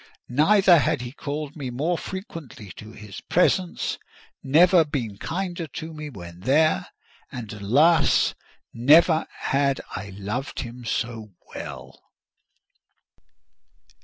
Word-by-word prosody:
Never 175 Hz, +6 st, +5 dB
had 125 Hz, -, 0 dB
he 120 Hz, -1 st, -6 dB
called 145 Hz, +1 st, -5 dB
me 140 Hz, -5 st, -5 dB
more 150 Hz, +8 st, -1 dB
frequently 165 Hz, -, -8 dB
to 110 Hz, +5 st, -11 dB
his 105 Hz, -3 st, -10 dB
presence; 180 Hz, 0 st, +1 dB, 0.4 s
never 170 Hz, +5 st, +5 dB
been 120 Hz, -9 st, -4 dB
kinder 175 Hz, -1 st, -4 dB
to 160 Hz, +3 st, -7 dB
me 150 Hz, -1 st, -7 dB
when 85 Hz, -8 st, -10 dB
there—and, 130 Hz, -, -1 dB
alas! 145 Hz, +10 st, +3 dB, 0.4 s
never 155 Hz, +7 st, +5 dB
had 140 Hz, 0 st, 0 dB, 0.2 s
I 95 Hz, +2 st, -6 dB
loved 105 Hz, +8 st, -4 dB
him 120 Hz, 0 st, -8 dB
so 110 Hz, -2 st, -3 dB, 0.2 s
well. -, -, -8 dB
140 Hz, 105 wpm, -24 LUFS, 115-165 Hz, 0.4 s, Never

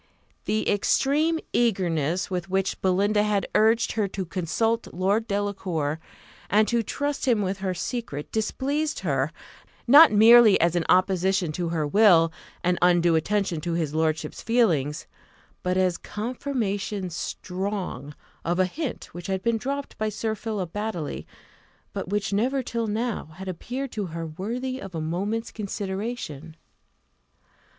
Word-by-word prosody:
The 215 Hz, +1 st, 0 dB
extreme 290 Hz, +10 st, +2 dB, 0.2 s
eagerness 185 Hz, -6 st, +1 dB
with 180 Hz, 0 st, -3 dB
which 190 Hz, 0 st, -1 dB
Belinda 200 Hz, +3 st, +2 dB
had 210 Hz, -1 st, 0 dB
urged 225 Hz, +2 st, +3 dB
her 215 Hz, -3 st, 0 dB
to 190 Hz, 0 st, -4 dB
consult 195 Hz, +6 st, -1 dB
Lord 200 Hz, +5 st, 0 dB
Delacour, 190 Hz, -7 st, -2 dB, 0.5 s
and 215 Hz, +2 st, +4 dB
to 235 Hz, -1 st, +2 dB
trust 285 Hz, +5 st, -3 dB
him 225 Hz, -5 st, +3 dB
with 190 Hz, 0 st, -2 dB
her 190 Hz, -1 st, -2 dB
secret, 185 Hz, -, -4 dB
displeased 280 Hz, +7 st, -1 dB
her; 140 Hz, -4 st, 0 dB, 0.5 s
not 290 Hz, +6 st, +9 dB
merely 220 Hz, 0 st, +7 dB
as 170 Hz, +1 st, +2 dB
an 175 Hz, -, +1 dB
opposition 185 Hz, -1 st, +2 dB
to 170 Hz, +2 st, -2 dB
her 160 Hz, -2 st, -1 dB
will, 165 Hz, -2 st, +5 dB, 0.3 s
and 180 Hz, 0 st, +1 dB
undue 175 Hz, -1 st, +4 dB
attention 180 Hz, 0 st, 0 dB
to 170 Hz, +1 st, -2 dB
his 160 Hz, -3 st, -1 dB
lordship's 160 Hz, 0 st, -1 dB
feelings, 170 Hz, -, +1 dB, 0.6 s
but 180 Hz, 0 st, 0 dB
as 185 Hz, -1 st, +1 dB
"confirmation 210 Hz, -5 st, -3 dB
strong" 180 Hz, -5 st, -4 dB, 0.3 s
of 175 Hz, +1 st, 0 dB
a 185 Hz, -, +4 dB
hint 280 Hz, -, -5 dB
which 175 Hz, 0 st, -7 dB
had 190 Hz, -1 st, -2 dB
been 230 Hz, -1 st, +1 dB
dropped 280 Hz, +3 st, -4 dB
by 215 Hz, 0 st, 0 dB
Sir 215 Hz, +1 st, -2 dB
Philip 210 Hz, -5 st, -4 dB
Baddely, 210 Hz, -8 st, -4 dB, 0.7 s
but -, -, -4 dB
which 205 Hz, 0 st, -1 dB
never 255 Hz, +6 st, +1 dB
till 230 Hz, -1 st, -2 dB
now 225 Hz, +2 st, -2 dB
had 190 Hz, +2 st, -8 dB
appeared 245 Hz, +9 st, -4 dB
to 205 Hz, -3 st, -3 dB
her 165 Hz, 0 st, -5 dB
worthy 235 Hz, +11 st, -4 dB
of 190 Hz, -3 st, -8 dB
a -, -, -2 dB
moment's 195 Hz, +8 st, -2 dB
consideration. 195 Hz, -, -5 dB
195 Hz, 145 wpm, -25 LUFS, 175-225 Hz, 0.7 s, not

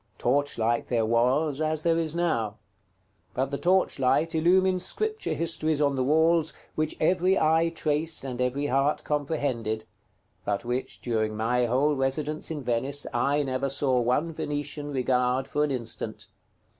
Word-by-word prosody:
Torchlight 120 Hz, -3 st, 0 dB
there 115 Hz, -3 st, +1 dB
was, 130 Hz, +6 st, +1 dB
as 155 Hz, 0 st, -1 dB
there 165 Hz, -1 st, +3 dB
is 160 Hz, -1 st, -2 dB
now; 115 Hz, -12 st, 0 dB, 0.8 s
but 135 Hz, +1 st, -1 dB
the 140 Hz, -, -1 dB
torchlight 165 Hz, -4 st, +2 dB
illumined 185 Hz, +3 st, +3 dB
Scripture 435 Hz, -, -2 dB
histories 160 Hz, -2 st, 0 dB
on 140 Hz, -2 st, +2 dB
the 130 Hz, -, 0 dB
walls, 160 Hz, +3 st, +3 dB, 0.2 s
which 155 Hz, 0 st, -2 dB
every 185 Hz, +3 st, +3 dB
eye 160 Hz, +2 st, +3 dB
traced 160 Hz, -1 st, -1 dB
and 125 Hz, -2 st, -4 dB
every 130 Hz, +3 st, 0 dB
heart 140 Hz, +2 st, +1 dB
comprehended, 135 Hz, -7 st, -2 dB, 0.6 s
but 100 Hz, +3 st, -2 dB
which, 125 Hz, +2 st, -3 dB
during 110 Hz, -3 st, -1 dB
my 120 Hz, +2 st, +1 dB
whole 140 Hz, +5 st, +2 dB
residence 145 Hz, +3 st, -2 dB
in 150 Hz, -4 st, -4 dB
Venice, 130 Hz, +4 st, -1 dB
I 145 Hz, +1 st, +1 dB
never 135 Hz, 0 st, -1 dB
saw 135 Hz, -2 st, +1 dB
one 145 Hz, +8 st, 0 dB
Venetian 145 Hz, 0 st, -4 dB
regard 125 Hz, 0 st, +1 dB
for 150 Hz, -, 0 dB
an 150 Hz, -, +1 dB
instant. 120 Hz, -4 st, -5 dB
145 Hz, 145 wpm, -27 LUFS, 125-155 Hz, 0.8 s, there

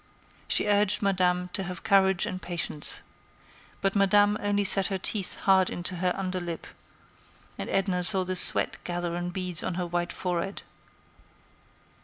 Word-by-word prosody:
She -, -, +3 dB
urged 205 Hz, -1 st, +2 dB
Madame 180 Hz, -2 st, +1 dB
to 195 Hz, -, 0 dB
have 180 Hz, -2 st, -6 dB
courage 190 Hz, -2 st, +3 dB
and 185 Hz, 0 st, -5 dB
patience. 165 Hz, -3 st, -2 dB, 0.8 s
But 195 Hz, +1 st, 0 dB
Madame 205 Hz, +1 st, +4 dB
only 205 Hz, 0 st, +1 dB
set 195 Hz, -1 st, +3 dB
her 195 Hz, -, -2 dB
teeth 190 Hz, +1 st, -1 dB
hard 190 Hz, -1 st, +4 dB
into 175 Hz, +1 st, -4 dB
her 180 Hz, +1 st, 0 dB
under 185 Hz, -1 st, -3 dB
lip, 170 Hz, -2 st, -6 dB, 0.9 s
and -, -, -6 dB
Edna 190 Hz, -2 st, 0 dB
saw 190 Hz, +1 st, +4 dB
the 185 Hz, 0 st, -3 dB
sweat -, -, +2 dB
gather 175 Hz, -1 st, -3 dB
in 175 Hz, 0 st, -3 dB
beads 180 Hz, -2 st, +1 dB
on 180 Hz, -, -3 dB
her 180 Hz, 0 st, -2 dB
white 175 Hz, 0 st, -2 dB
forehead. 180 Hz, +2 st, -3 dB
185 Hz, 155 wpm, -27 LUFS, 175-195 Hz, 0.9 s, Madame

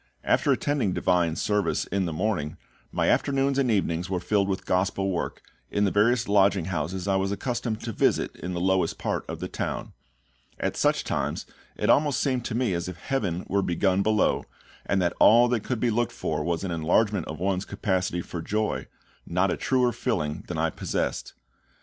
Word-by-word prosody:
After -, -, +2 dB
attending 140 Hz, -10 st, +1 dB
Divine 90 Hz, -3 st, +2 dB
service 105 Hz, +3 st, 0 dB
in 100 Hz, -1 st, -1 dB
the -, -, -2 dB
morning, 80 Hz, -4 st, -1 dB, 0.3 s
my -, -, 0 dB
afternoons 140 Hz, 0 st, +2 dB
and 130 Hz, -3 st, +2 dB
evenings 90 Hz, -4 st, 0 dB
were 95 Hz, -2 st, 0 dB
filled 100 Hz, +1 st, +1 dB
with 95 Hz, -, -2 dB
Gospel 95 Hz, +1 st, 0 dB
work, 85 Hz, -, -3 dB, 0.3 s
in 105 Hz, -, +1 dB
the 100 Hz, -, +1 dB
various 115 Hz, +4 st, +3 dB
lodging 100 Hz, -3 st, +3 dB
houses 90 Hz, +4 st, -3 dB
I 95 Hz, -1 st, +3 dB
was 95 Hz, 0 st, 0 dB
accustomed 120 Hz, +1 st, -2 dB
to 115 Hz, -, -4 dB
visit -, -, +1 dB
in 90 Hz, -, -5 dB
the 85 Hz, -, -2 dB
lowest 95 Hz, +1 st, +1 dB
part -, -, -3 dB
of -, -, -5 dB
the -, -, -3 dB
town. -, -, -4 dB, 0.7 s
At -, -, -1 dB
such -, -, +2 dB
times -, -, -2 dB, 0.3 s
it -, -, +2 dB
almost 145 Hz, -2 st, +3 dB
seemed 130 Hz, -4 st, 0 dB
to 115 Hz, -, -3 dB
me 120 Hz, -5 st, +1 dB
as 85 Hz, +1 st, -2 dB
if 90 Hz, -, -8 dB
heaven 95 Hz, -6 st, -2 dB
were 100 Hz, +1 st, +1 dB
begun 95 Hz, +1 st, +1 dB
below, 110 Hz, +1 st, +2 dB, 0.4 s
and 100 Hz, -, +2 dB
that 85 Hz, -, +1 dB
all 120 Hz, +3 st, +7 dB
that 120 Hz, -2 st, +2 dB
could 125 Hz, -3 st, -2 dB
be 120 Hz, 0 st, +2 dB
looked 120 Hz, +2 st, 0 dB
for 75 Hz, -1 st, -2 dB
was 85 Hz, +1 st, -1 dB
an 95 Hz, -, -2 dB
enlargement 85 Hz, +4 st, +1 dB
of 80 Hz, -1 st, -6 dB
one's 95 Hz, 0 st, 0 dB
capacity 90 Hz, -3 st, -1 dB
for 85 Hz, -, -6 dB
joy, 105 Hz, +5 st, -1 dB, 0.4 s
not 90 Hz, +2 st, +1 dB
a -, -, 0 dB
truer 125 Hz, -2 st, +2 dB
filling 85 Hz, -6 st, -2 dB
than 90 Hz, -, -4 dB
I 80 Hz, 0 st, +1 dB
possessed. -, -, -3 dB
95 Hz, 190 wpm, -26 LUFS, 90-110 Hz, 0.7 s, all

